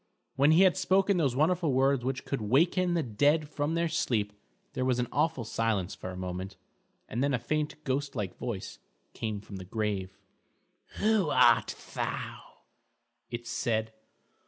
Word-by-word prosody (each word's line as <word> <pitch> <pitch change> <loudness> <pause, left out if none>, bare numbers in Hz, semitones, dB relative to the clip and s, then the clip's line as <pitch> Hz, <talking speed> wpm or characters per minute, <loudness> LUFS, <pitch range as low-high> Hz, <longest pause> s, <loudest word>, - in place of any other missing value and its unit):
When 140 +2 +4
he 175 +4 +6
had 185 -1 +4
spoken 190 +1 +3
those 140 -7 +1
wonderful 160 +1 +2
words 135 0 +3
which 130 +1 -3
could 140 - -2
waken 170 - +2
the 165 - +1
dead 145 +7 +2
from 150 +2 -2
their 170 0 +1
sleep, 105 -9 0 0.4
there 130 - -1
was 130 -1 +2
an 125 -1 0
awful 150 -3 +1
silence 110 -4 -1
for 95 - -7
a 90 - -7
moment, 95 +1 -5 0.5
and 120 +4 -2
then 140 -2 +2
a - - +1
faint 150 +5 -2
ghost 140 0 -2
like 100 -6 -3
voice 100 - -5 0.3
came 110 -3 -4
from 100 -1 -9
the 95 - -7
grave. 100 -1 -3 0.8
"Who 210 -6 +2
art 120 -4 +4 0.2
thou?" - - -5 0.7
it 120 0 -5
said. 110 -2 -1
130 Hz, 160 wpm, -29 LUFS, 110-155 Hz, 0.8 s, he